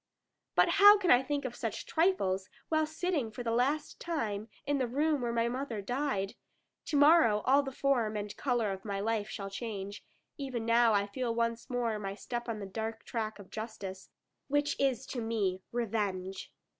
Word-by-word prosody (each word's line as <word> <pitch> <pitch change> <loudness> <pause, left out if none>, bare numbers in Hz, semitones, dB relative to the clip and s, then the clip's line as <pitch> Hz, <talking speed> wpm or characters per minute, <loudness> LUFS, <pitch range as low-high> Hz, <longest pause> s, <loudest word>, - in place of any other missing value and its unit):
But - - +6
how 410 +1 +8
can 375 -4 +2
I 245 - +7
think 285 +1 -2
of 240 -2 -4
such - - -4
trifles, 195 - +1 0.2
while 315 -1 +2
sitting 315 -5 -1
for 220 +3 -7
the 230 - -1
last 275 +6 0
time 220 -11 -2 0.2
in 285 -1 +1
the 255 - +1
room 290 +3 +1
where 240 -1 -1
my 235 0 +1
mother 245 -2 -3
died? 210 -2 -1 0.5
To 295 - 0
morrow 285 -8 +6
all 275 +2 +5
the 270 -1 -5
form 245 -6 +1
and 205 0 -5
colour 240 -6 0
of 190 0 -6
my 200 -2 -3
life 215 0 -1
shall 195 -2 -5
change; 200 -2 -5 0.4
even 255 -5 -3
now 230 0 +5
I 200 -1 +3
feel 230 +3 -3
once 230 +1 -1
more 235 -4 -1
my 195 -1 -4
step 240 +2 -5
on 225 - -2
the 200 - -5
dark 220 +3 -5
track 220 -2 -3
of 200 -2 -13
justice, 205 -4 -6 0.4
which 290 +1 +1
is 265 -2 +1
to 245 - -4
me 205 -5 -1
revenge. 200 -5 -2
230 Hz, 185 wpm, -31 LUFS, 210-275 Hz, 0.5 s, how